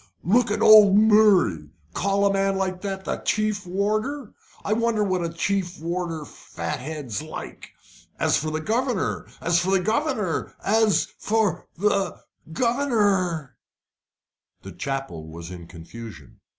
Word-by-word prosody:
Look 235 Hz, +7 st, +3 dB
at 210 Hz, -, 0 dB
old 210 Hz, -2 st, +8 dB
Murray 205 Hz, -, +4 dB, 0.2 s
call 200 Hz, +1 st, +1 dB
a 200 Hz, -, +3 dB
man 195 Hz, 0 st, +1 dB
like 185 Hz, -1 st, -2 dB
that 195 Hz, -1 st, -4 dB
chief 215 Hz, -2 st, -1 dB
warder. 215 Hz, +9 st, -2 dB, 0.3 s
I 210 Hz, -, +1 dB
wonder 230 Hz, -1 st, +1 dB
what 185 Hz, -3 st, 0 dB
a 165 Hz, -, -3 dB
chief 190 Hz, +3 st, -1 dB, 0.6 s
fat 150 Hz, -, -6 dB
head's 140 Hz, -4 st, -5 dB
like? 155 Hz, 0 st, -9 dB, 0.5 s
As -, -, +2 dB
for 155 Hz, -, -1 dB
the 155 Hz, 0 st, -3 dB
governor 235 Hz, +3 st, -1 dB
as 170 Hz, 0 st, +2 dB
for 180 Hz, -, -1 dB
the 195 Hz, 0 st, +3 dB
governor 215 Hz, -, -1 dB
as 215 Hz, -3 st, +3 dB
for 210 Hz, -5 st, 0 dB
the 195 Hz, -2 st, 0 dB, 0.3 s
governor 200 Hz, -, 0 dB, 0.5 s
" -, -, -58 dB
The -, -, -8 dB
chapel 135 Hz, -, -5 dB
was 85 Hz, +2 st, -9 dB
in 85 Hz, -2 st, -9 dB
confusion. 85 Hz, -, -11 dB
195 Hz, 135 wpm, -24 LUFS, 155-215 Hz, 0.6 s, old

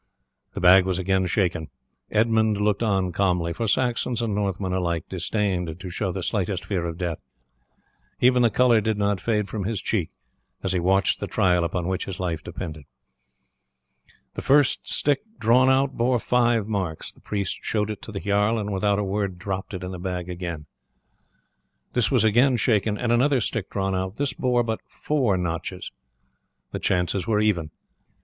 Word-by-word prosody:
The -, -, -3 dB
bag 90 Hz, 0 st, +7 dB
was 95 Hz, -2 st, 0 dB
again 95 Hz, 0 st, +1 dB
shaken. 90 Hz, -4 st, 0 dB, 0.4 s
Edmund 110 Hz, -1 st, +2 dB
looked 105 Hz, 0 st, +1 dB
on 95 Hz, -5 st, +1 dB
calmly, 90 Hz, -2 st, 0 dB
for 115 Hz, +4 st, -2 dB
Saxons 120 Hz, +1 st, 0 dB
and 115 Hz, -3 st, -1 dB
Northmen 100 Hz, -2 st, -1 dB
alike 85 Hz, -3 st, -1 dB
disdained 90 Hz, -3 st, -2 dB
to 90 Hz, 0 st, -7 dB
show 95 Hz, +2 st, -2 dB
the 95 Hz, 0 st, -4 dB
slightest 95 Hz, -3 st, -2 dB
fear 90 Hz, -4 st, -2 dB
of 85 Hz, -1 st, -5 dB
death; 85 Hz, -3 st, -3 dB, 1.0 s
even 125 Hz, 0 st, +4 dB
the 120 Hz, -, +5 dB
colour 120 Hz, 0 st, +4 dB
did 110 Hz, 0 st, 0 dB
not 100 Hz, -1 st, 0 dB
fade 105 Hz, -3 st, 0 dB
from 100 Hz, +1 st, -4 dB
his 110 Hz, -1 st, -1 dB
cheek 95 Hz, -5 st, -1 dB, 0.5 s
as 95 Hz, -, 0 dB
he 95 Hz, -, +1 dB
watched 95 Hz, +3 st, +2 dB
the -, -, -3 dB
trial 90 Hz, -2 st, +2 dB
upon 85 Hz, +1 st, -2 dB
which 95 Hz, 0 st, -2 dB
his 95 Hz, -, -6 dB
life 85 Hz, -4 st, -2 dB
depended. 80 Hz, -5 st, -7 dB, 1.5 s
The -, -, -5 dB
first 140 Hz, -1 st, +3 dB
stick 145 Hz, -2 st, +2 dB, 0.2 s
drawn 125 Hz, +3 st, +4 dB
out 135 Hz, +1 st, +2 dB
bore 125 Hz, +2 st, +2 dB
five 120 Hz, -2 st, +2 dB
marks; 95 Hz, -7 st, -3 dB
the -, -, -24 dB
priest 100 Hz, -3 st, -3 dB
showed 105 Hz, -1 st, -1 dB
it 105 Hz, -, -7 dB
to -, -, -9 dB
the 100 Hz, -, -4 dB
jarl, 105 Hz, +3 st, +2 dB
and 105 Hz, -1 st, -3 dB
without 100 Hz, +1 st, +1 dB
a 105 Hz, -, 0 dB
word 100 Hz, -1 st, -2 dB
dropped 95 Hz, +1 st, -4 dB
it 95 Hz, -2 st, -6 dB
in 90 Hz, -, -5 dB
the 90 Hz, -, -6 dB
bag 90 Hz, -1 st, -4 dB
again. 85 Hz, -4 st, -5 dB, 1.3 s
This -, -, +2 dB
was -, -, +3 dB
again 120 Hz, +4 st, +4 dB
shaken 110 Hz, -2 st, +1 dB
and 120 Hz, +1 st, -1 dB
another 130 Hz, +3 st, +3 dB
stick 105 Hz, -2 st, -2 dB
drawn 95 Hz, -1 st, -1 dB
out; 95 Hz, +1 st, -2 dB
this 140 Hz, +2 st, -1 dB
bore 125 Hz, -3 st, +1 dB
but 110 Hz, -1 st, -2 dB
four 130 Hz, -10 st, 0 dB
notches; 90 Hz, +1 st, -4 dB, 0.8 s
the -, -, -4 dB
chances 90 Hz, +2 st, 0 dB
were 110 Hz, -2 st, +2 dB
even. 95 Hz, -8 st, +1 dB
100 Hz, 180 wpm, -24 LUFS, 90-110 Hz, 1.5 s, bag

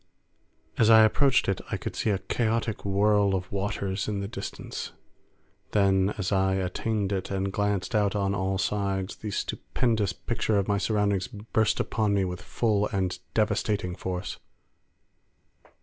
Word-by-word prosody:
As 110 Hz, -, +5 dB
I 110 Hz, -1 st, +9 dB
approached 135 Hz, +4 st, +3 dB
it 95 Hz, -, 0 dB
I -, -, -1 dB
could -, -, -6 dB
see -, -, 0 dB
a 100 Hz, -, +2 dB
chaotic 110 Hz, +3 st, -1 dB
whirl 100 Hz, 0 st, +3 dB
of 90 Hz, -1 st, -4 dB
waters 100 Hz, -1 st, -2 dB
in 105 Hz, -2 st, -1 dB
the 100 Hz, -, -3 dB
distance. 100 Hz, -2 st, -6 dB, 0.8 s
Then, 100 Hz, -1 st, +3 dB
as 95 Hz, -4 st, -2 dB
I 95 Hz, -1 st, +2 dB
attained 100 Hz, +2 st, -1 dB
it 95 Hz, -2 st, -2 dB
and 95 Hz, 0 st, -2 dB
glanced 105 Hz, -1 st, -1 dB
out 105 Hz, -2 st, +2 dB
on 100 Hz, -1 st, +1 dB
all 95 Hz, 0 st, 0 dB
sides, 100 Hz, -1 st, -1 dB
the 110 Hz, -, -5 dB
stupendous 110 Hz, 0 st, -1 dB
picture 110 Hz, +1 st, -1 dB
of 100 Hz, -, +1 dB
my 100 Hz, -1 st, +1 dB
surroundings 100 Hz, -3 st, +1 dB
burst 110 Hz, -1 st, 0 dB
upon 105 Hz, -2 st, +1 dB
me 95 Hz, -1 st, +2 dB
with 90 Hz, -1 st, -5 dB
full 105 Hz, -3 st, +1 dB
and 95 Hz, -2 st, -2 dB, 0.2 s
devastating 105 Hz, -3 st, +1 dB
force. 90 Hz, 0 st, -4 dB
100 Hz, 150 wpm, -27 LUFS, 95-105 Hz, 0.8 s, I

